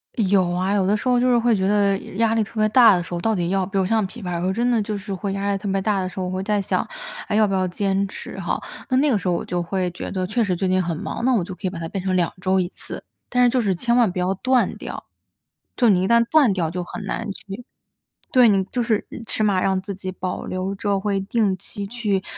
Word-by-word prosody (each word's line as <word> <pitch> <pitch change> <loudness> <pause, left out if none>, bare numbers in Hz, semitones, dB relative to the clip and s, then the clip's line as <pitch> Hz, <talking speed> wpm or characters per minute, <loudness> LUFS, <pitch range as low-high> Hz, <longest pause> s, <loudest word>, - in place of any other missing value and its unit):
有 195 -4 +2
啊， 185 +3 0
有 200 -2 +2
的 205 +2 +3
时 240 - -5
候 250 -1 +4
就 250 +1 +3
是 245 - +4
会 235 -1 +3
觉 190 -1 0
得 200 -1 +3 0.2
压 225 +1 +2
力 225 -1 +2
特 220 +1 -7
别 215 - +4
大 225 -2 +7
的 175 - -1
时 175 - -8
候， 175 - -2
到 220 +5 +1
底 175 -2 -1
要 190 0 +1
比 195 +2 -4
如 190 - +2
像 220 +1 +1
琵 225 +3 -10
琶， 180 -1 -3
有 - - -2
时 175 - -2
候 185 - +1
真 240 +4 +1
的 230 -2 +2
就 210 0 -3
是 200 0 -6
会 195 +1 -3
压 200 +1 -1
力 200 - 0
特 205 +1 -6
别 195 - +1
大 205 0 +1
的 185 - -2
时 185 - -8
候， 185 - -1
我 180 - -3
会 185 0 -2
在 210 +1 0
想， 195 - -1 0.4
还 210 - -1
要 215 0 +4
不 195 - -2
要 185 -1 +1
坚 195 +2 0
持 - - -8
哈， - - -2 0.3
那 255 - +2
那 285 +2 +3
个 225 - +3
时 185 - -5
候 175 - +2
我 - - -3
就 175 -1 -2
会 180 +1 -2
觉 175 - -6
得 185 -2 -2
确 225 +5 0
实 190 -4 0
最 190 +2 -1
近 185 0 +2
很 170 -1 -2
忙， - - -5
那 260 - +4
我 200 - +1
就 185 - -7
可 - - -14
以 - - 0
把 180 - -8
它 165 0 -4
变 185 +3 -4
成 190 -1 0
2 175 -2 +1
周 190 0 +2
1 180 - 0
次。 - - -8 0.3
但 250 0 +3
是 245 - +6
就 255 +1 +1
是 195 -4 +1
千 235 +6 +1
万 235 -6 +4
不 180 - -8
要 180 +1 +1
断 255 +5 +1
掉， - - -7 0.7
就 240 -3 +4
你 185 -3 +3
一 - - +1
旦 235 +1 +5
断 295 -8 +5
掉 170 -4 -1
就 180 +1 -3
很 200 - -7
难 225 +2 -3
去 195 +4 -9 0.7
对， 250 -2 +6
你 195 -2 +3
就 240 +6 -2
是 225 -3 0 0.2
起 215 - -1
码 200 -3 +2
让 190 -1 +1
自 200 +1 -5
己 185 0 -6
保 185 0 -4
留 185 +1 -3
着 200 0 -1
会 200 0 0
定 200 -1 0
期 200 +2 -6
去 210 -3 -1
195 Hz, 315 characters per minute, -22 LUFS, 185-220 Hz, 0.7 s, 大